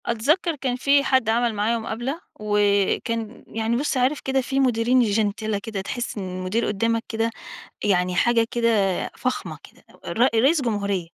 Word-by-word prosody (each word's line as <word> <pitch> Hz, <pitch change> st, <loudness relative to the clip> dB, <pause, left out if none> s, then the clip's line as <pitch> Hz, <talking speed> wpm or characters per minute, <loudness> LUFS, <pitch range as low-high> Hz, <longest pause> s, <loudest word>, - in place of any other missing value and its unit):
أتذكّر 305 Hz, +9 st, +1 dB
كان 260 Hz, -3 st, -2 dB
في 280 Hz, +2 st, +3 dB
حد 260 Hz, -5 st, +2 dB
عمل 235 Hz, +1 st, +2 dB
معايا 215 Hz, +3 st, 0 dB
مُقابله، 240 Hz, +8 st, -4 dB, 0.2 s
وكان 210 Hz, +2 st, 0 dB
يعني 225 Hz, +1 st, -1 dB
بُص، 275 Hz, +2 st, -1 dB
عارف 260 Hz, +4 st, +1 dB
كده 265 Hz, 0 st, 0 dB
في 270 Hz, +1 st, -2 dB
مُديرين 250 Hz, -1 st, +3 dB
جِنتلة 215 Hz, -1 st, 0 dB
كده 215 Hz, -4 st, -4 dB
تحس 240 Hz, +4 st, -4 dB
إن 190 Hz, -2 st, -4 dB
المدير 185 Hz, +6 st, -1 dB
قُدامك 230 Hz, +3 st, 0 dB
كده، 225 Hz, 0 st, 0 dB, 0.6 s
يعني 180 Hz, -3 st, +2 dB
حاجة 230 Hz, +4 st, +3 dB
كده 235 Hz, -1 st, +1 dB, 0.5 s
فخمة 255 Hz, 0 st, -3 dB
كده، -, -, -18 dB, 0.2 s
ر -, -, -4 dB, 0.2 s
رئيس 295 Hz, +3 st, +3 dB
جمهورية، 200 Hz, -6 st, -1 dB
230 Hz, 155 wpm, -23 LUFS, 210-255 Hz, 0.6 s, في